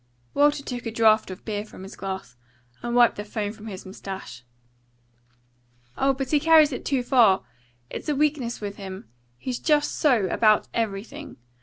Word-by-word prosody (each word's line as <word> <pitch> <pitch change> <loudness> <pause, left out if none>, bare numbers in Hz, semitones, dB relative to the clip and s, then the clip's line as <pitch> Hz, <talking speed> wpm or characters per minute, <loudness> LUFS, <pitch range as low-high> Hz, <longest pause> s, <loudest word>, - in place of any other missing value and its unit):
Walker 290 0 +3
took 245 -3 -5
a - - -3
draught 220 -1 +4
of 185 +1 -9
beer 210 -2 -2
from 210 -3 -12
his 195 - -10
glass, 190 -7 -6 0.5
and 240 0 -3
wiped 240 -1 +5
the 205 - -4
foam 210 0 -4
from 220 0 -11
his 190 -3 -8
moustache. 190 - -8 1.5
"Oh, 270 0 +2
but 270 -1 -4
he 300 - +4
carries 315 -1 +6
it 250 - -5
too 265 -3 0
far! 230 - +4 0.5
It's - - -5
a 295 - +1
weakness 280 -5 0
with 205 -1 -6
him. 190 - -8 0.3
He's 250 - -4
just 295 -2 +2
so 250 -9 +3
about 215 +2 +3
everything. 230 +7 -4
230 Hz, 170 wpm, -25 LUFS, 200-275 Hz, 1.5 s, carries